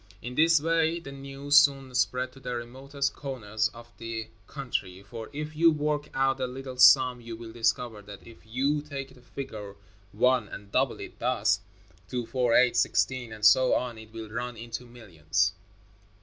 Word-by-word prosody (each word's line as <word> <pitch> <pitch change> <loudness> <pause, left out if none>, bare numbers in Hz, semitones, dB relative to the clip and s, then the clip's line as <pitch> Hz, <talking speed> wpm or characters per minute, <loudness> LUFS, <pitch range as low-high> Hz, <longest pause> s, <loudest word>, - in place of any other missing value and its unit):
In 120 +2 -7
this 165 +3 +5
way 165 +1 +1
the 140 -5 -9
news 140 +1 0
soon 135 -2 +4
spread 125 0 0
to 135 - -15
the 125 -2 -4
remotest 135 +4 -3
corners 110 -6 -2
of 120 0 -13
the 115 -1 -5 0.2
country, 100 -9 -4
for 110 +2 -8
if 150 +1 -6
you 165 +2 +6
work 150 -1 -1
out 135 0 +2
a 130 - 0
little 130 0 -7
sum 125 -1 +7
you 115 -1 -7
will 115 0 -9
discover 115 -1 0
that 100 0 -12
if 115 - -14
you 135 +6 0
take 140 -3 -7
the 125 - -18
figure 110 -6 -7 0.4
one 125 +1 +2
and 100 0 -10
double 130 +1 +1
it - - -9
thus: 110 -4 +2 0.5
two, 125 -2 -2
four, 125 -1 +1
eight, 125 -1 +5
sixteen, 125 0 +1
and 110 -1 -3
so 130 +4 +6
on, 120 -3 -2
it 110 -1 -13
will 110 -1 -8
run 120 +1 -4
into 115 +2 -7
millions. 95 -5 -1
125 Hz, 175 wpm, -28 LUFS, 115-135 Hz, 0.5 s, sum